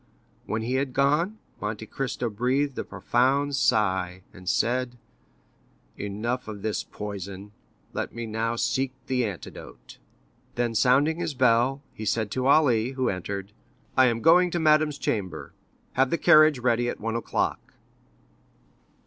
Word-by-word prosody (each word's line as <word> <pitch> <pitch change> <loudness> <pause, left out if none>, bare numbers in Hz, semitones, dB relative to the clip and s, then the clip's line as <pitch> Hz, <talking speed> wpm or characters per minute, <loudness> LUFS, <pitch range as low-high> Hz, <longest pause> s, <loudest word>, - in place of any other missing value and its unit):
When 110 +1 -2
he 120 +3 -2
had 135 -2 -4
gone, 150 +10 +2 0.2
Monte 105 +1 -4
Cristo 125 +1 -3
breathed 130 +6 0
a - - -1
profound 135 +4 +1
sigh, 95 -7 +1
and 90 -1 -6
said: 125 +3 0 1.0
"Enough 110 +5 -3
of 105 -2 -7
this 110 -1 -1
poison, 100 -1 -7 0.4
let - - -3
me 115 0 -5
now 115 +1 -2
seek 130 +2 0
the 125 -2 0
antidote." 100 -4 -10 0.6
Then 120 -1 0
sounding 140 - +3
his 165 -4 -3
bell, 125 +2 +2
he 110 - -7
said 105 0 0
to 130 0 -1
Ali, 130 -5 +4
who 130 -2 0
entered: 100 +1 -4 0.4
"I 130 -1 +6
am 115 -2 -1
going 180 +2 +6
to 175 - -2
madame's 155 -2 +3
chamber—have 105 - -3
the 170 - +1
carriage 155 -2 +6
ready 120 -1 +1
at - - -5
one 115 +1 -3
o'clock." 115 - -2
120 Hz, 140 wpm, -26 LUFS, 105-135 Hz, 1.0 s, I